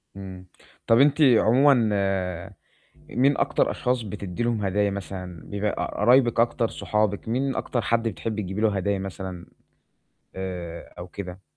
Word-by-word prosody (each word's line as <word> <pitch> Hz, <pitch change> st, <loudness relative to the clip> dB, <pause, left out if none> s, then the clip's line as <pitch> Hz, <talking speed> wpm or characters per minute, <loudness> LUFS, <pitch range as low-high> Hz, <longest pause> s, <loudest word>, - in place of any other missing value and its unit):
امم، 95 Hz, -2 st, -9 dB, 0.4 s
طَب 115 Hz, +2 st, +5 dB
أنتِ 145 Hz, +2 st, +4 dB
عمومًا 130 Hz, +2 st, +6 dB, 1.4 s
مين 135 Hz, +3 st, +2 dB
أكتر -, -, +1 dB
أشخاص 125 Hz, -1 st, -1 dB
بتدّي 100 Hz, 0 st, -5 dB
لهُم 115 Hz, -3 st, 0 dB
هدايا 100 Hz, +1 st, +1 dB
مثلًا، 90 Hz, -3 st, -6 dB
بيبقى 100 Hz, 0 st, -1 dB
ق -, -, -3 dB
قرايبِك 120 Hz, +1 st, +4 dB
أكتر، 115 Hz, -1 st, +2 dB
صحابِك 105 Hz, -1 st, -1 dB
مين 130 Hz, +3 st, 0 dB
أكتر 120 Hz, -, -2 dB
حَدّ 115 Hz, +2 st, 0 dB
بتحبّي 110 Hz, +1 st, -3 dB
تجيبي 95 Hz, +3 st, -4 dB
له 105 Hz, -2 st, +2 dB
هدايا 100 Hz, +1 st, 0 dB
مثلًا 95 Hz, -2 st, -6 dB, 0.9 s
آآ 90 Hz, -3 st, -6 dB
أو 90 Hz, +1 st, -7 dB
كده؟ 95 Hz, 0 st, -8 dB
105 Hz, 140 wpm, -25 LUFS, 95-120 Hz, 1.4 s, عمومًا